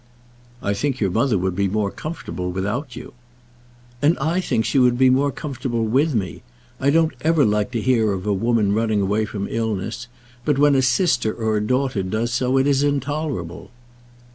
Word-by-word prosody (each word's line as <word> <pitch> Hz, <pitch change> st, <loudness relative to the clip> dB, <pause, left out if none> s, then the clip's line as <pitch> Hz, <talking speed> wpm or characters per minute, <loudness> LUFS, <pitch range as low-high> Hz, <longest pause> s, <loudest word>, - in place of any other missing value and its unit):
"I 100 Hz, -, 0 dB
think 130 Hz, +5 st, -2 dB
your 100 Hz, -4 st, 0 dB
mother 115 Hz, +1 st, +2 dB
would 95 Hz, 0 st, -1 dB
be 100 Hz, +1 st, +1 dB
more 100 Hz, 0 st, -1 dB
comfortable 90 Hz, -, -5 dB
without 115 Hz, -, -3 dB
you." 125 Hz, +2 st, -9 dB, 0.9 s
"And 150 Hz, +4 st, +3 dB
I 165 Hz, +6 st, 0 dB
think 110 Hz, -10 st, 0 dB
she 140 Hz, -, +2 dB
would 125 Hz, -1 st, +4 dB
be 130 Hz, 0 st, +5 dB
more 140 Hz, +2 st, +2 dB
comfortable 125 Hz, -6 st, -3 dB
with 135 Hz, +6 st, +1 dB
me. 95 Hz, -5 st, -3 dB, 0.4 s
I 135 Hz, -, +2 dB
don't 160 Hz, +2 st, +3 dB
ever 160 Hz, -2 st, +3 dB
like 105 Hz, +1 st, +1 dB
to 115 Hz, -, -1 dB
hear 115 Hz, -3 st, +2 dB
of 95 Hz, -1 st, -4 dB
a 105 Hz, -, +1 dB
woman 110 Hz, 0 st, +1 dB
running 110 Hz, -1 st, +1 dB
away 105 Hz, +3 st, +1 dB
from 100 Hz, -1 st, -4 dB
illness; 110 Hz, +1 st, -3 dB, 0.4 s
but 145 Hz, 0 st, +1 dB
when 145 Hz, 0 st, +4 dB
a 135 Hz, -, +3 dB
sister 125 Hz, -, +2 dB
or 110 Hz, -2 st, -1 dB
a -, -, 0 dB
daughter 125 Hz, -1 st, 0 dB
does 110 Hz, +5 st, -2 dB
so, 125 Hz, +2 st, +1 dB
it 135 Hz, -, +3 dB
is 140 Hz, -1 st, +2 dB
intolerable." 145 Hz, -, -2 dB
120 Hz, 190 wpm, -21 LUFS, 105-140 Hz, 0.9 s, be